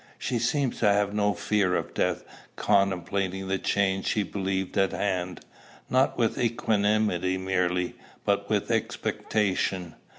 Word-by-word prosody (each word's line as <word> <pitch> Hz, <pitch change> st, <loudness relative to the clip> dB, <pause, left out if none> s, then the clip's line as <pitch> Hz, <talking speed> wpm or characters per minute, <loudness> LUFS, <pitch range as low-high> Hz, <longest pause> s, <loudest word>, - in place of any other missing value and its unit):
She 120 Hz, -, -1 dB
seemed 130 Hz, +2 st, +1 dB
to 110 Hz, -, +3 dB
have 100 Hz, 0 st, +1 dB
no 105 Hz, -1 st, +1 dB
fear 100 Hz, -1 st, +1 dB
of -, -, -3 dB
death, -, -, 0 dB, 0.3 s
contemplating 95 Hz, -1 st, 0 dB
the 95 Hz, 0 st, 0 dB
change 95 Hz, -1 st, 0 dB
she 105 Hz, -, +1 dB
believed 95 Hz, -1 st, -2 dB
at 95 Hz, -1 st, +2 dB
hand, 95 Hz, -2 st, -2 dB, 0.5 s
not 130 Hz, +1 st, +3 dB
with 115 Hz, -2 st, +1 dB
equanimity 105 Hz, -5 st, +1 dB
merely, 90 Hz, -1 st, 0 dB, 0.3 s
but -, -, +1 dB
with -, -, 0 dB
expectation. 95 Hz, -4 st, -1 dB
100 Hz, 130 wpm, -27 LUFS, 95-105 Hz, 0.5 s, to